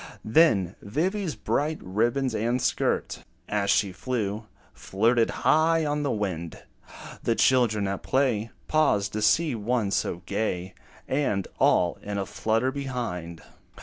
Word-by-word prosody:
Then 110 - +3
Vivy's 170 - -2
bright 155 +2 -1
ribbons 120 +7 0
and 120 +3 0
skirt, - - -1 0.2
As 100 -1 -1
she 100 -3 +3
flew, 110 0 -3 0.3
flirted 115 +4 +1 0.2
high 160 +1 +4
on 145 0 -1
the 145 - -1
wind; 90 -8 -3 0.6
The 115 - +1
children 115 -7 +3
at 100 0 -3
play, 120 -5 0 0.2
Paused 105 -10 +2
to 110 - -2
see 155 +7 +3
one 110 -1 -1
so 90 -3 -1
gay, 95 -2 -2 0.3
And 130 -9 0
all 85 -1 +3
in 100 0 -4
a 100 - -1
flutter 115 +6 0
behind. 120 - -5
110 Hz, 130 wpm, -26 LUFS, 100-135 Hz, 0.6 s, high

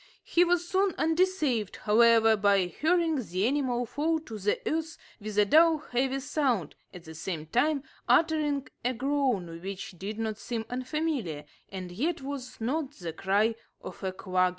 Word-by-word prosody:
He 345 - +3
was 350 0 +1
soon 380 0 +1
undeceived, 320 - +1
however, 225 0 +5
by 200 -2 +3
hearing 320 - +1
the 185 0 -1
animal 250 -2 0
fall 315 +7 0
to 225 -9 -8
the 205 +1 0
earth 320 0 -2 0.2
with 210 -1 -6
a 210 - +6
dull 320 +7 +5
heavy 265 -1 -1
sound, 255 - 0 0.2
at 180 - -11
the 160 - -10
same 160 -1 -5
time 275 - +1 0.3
uttering 300 -4 +3 0.2
a 250 +1 0
groan, 245 -11 -1
which 195 +1 -6
did 205 +3 -5
not 220 -1 -3
seem 230 -2 -4
unfamiliar, 255 - -2 0.2
and 185 -2 -7
yet 285 - -2
was 270 -2 -6
not 275 +5 -2
the 170 - -6
cry 200 +6 +2 0.3
of - - -10
a 190 - -1
quagga. 185 -1 +1
245 Hz, 160 wpm, -28 LUFS, 200-305 Hz, 0.3 s, a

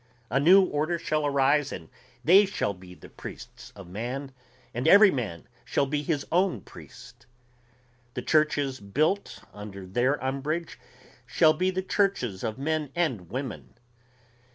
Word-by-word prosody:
A 135 - +2
new 185 +7 +7
order 155 0 -1
shall 155 -2 -1
arise 140 +1 +2
and 80 - -7 0.4
they 190 +6 +6
shall 145 - -2
be 90 -1 -14
the - - -14
priests - - -11
of 100 -3 -11
man, 125 +9 -5 0.4
and 120 +2 -2
every 205 0 +8
man 105 - -4 0.2
shall 140 - 0
be 145 +1 -1
his 150 -1 -2
own 180 - +1
priest. - - -14 0.9
The - - -4
churches 145 -3 +1
built 155 - -1
under 100 -2 -9
their 120 +9 +1
umbrage 145 +5 -3 0.5
shall 155 -1 +4
be 185 +4 0
the 185 0 -2
churches 185 - 0
of 110 - -3
men 150 +1 -1
and 130 - -1
women. 130 +2 -6
140 Hz, 145 wpm, -27 LUFS, 120-165 Hz, 0.9 s, every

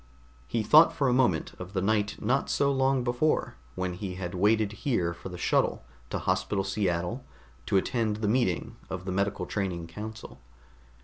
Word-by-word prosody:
He 115 -2 -1
thought 155 +8 +7
for 140 - +1
a 125 - +3
moment 120 -11 +2
of 90 +1 -8
the 95 - 0
night 105 +1 +1
not 135 +2 0
so 140 0 +2
long 135 -1 +2
before 120 +6 0 0.2
when 90 -1 -2
he 95 0 -5
had 90 -1 -5
waited 105 +2 +2
here 90 -11 0
for 85 - -9
the 90 - -7
shuttle - - +1 0.2
to - - -2
Hospital 95 +1 0
Seattle, 95 +4 -1 0.4
to 100 - +3
attend 110 +1 0
the 105 0 -2
meeting 110 -6 0
of 90 -1 -5
the 95 - -2
medical 100 +2 -1
training 90 -5 -3
council. 105 +6 -8
105 Hz, 175 wpm, -28 LUFS, 90-120 Hz, 0.4 s, thought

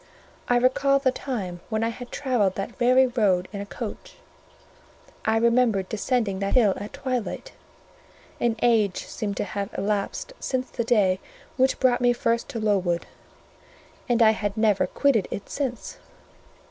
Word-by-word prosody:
I 245 - +3
recalled 275 +3 +3
the 260 - +4
time 205 -10 -4
when 220 -1 0
I 230 - +1
had 245 +1 -8
travelled 240 -9 0
that 195 - -5
very 255 +2 +5
road 205 -8 +1
in 200 - -4
a 200 - -7
coach; - - -7 1.1
I 220 +1 +3
remembered 230 -4 +2
descending 220 -2 -1
that 200 +4 -1
hill 220 -6 +5
at 205 +2 -7
twilight; 255 - -3 0.9
an 235 -2 +1
age 220 -5 +2
seemed 205 -4 -4
to - - 0
have 200 0 -4
elapsed 205 - -2
since 255 -1 -2
the 235 - -2
day 200 -5 +3 0.4
which 260 +1 +2
brought 250 -2 +3
me 245 0 +4
first 235 -1 -1
to 230 - -4
Lowood, 190 -5 +1 1.0
and 240 -1 +4
I 220 - +7
had 205 -1 -3
never 210 -4 +3
quitted 245 -2 +2
it 200 - -6
since. 260 -4 -4
225 Hz, 155 wpm, -25 LUFS, 200-250 Hz, 1.1 s, I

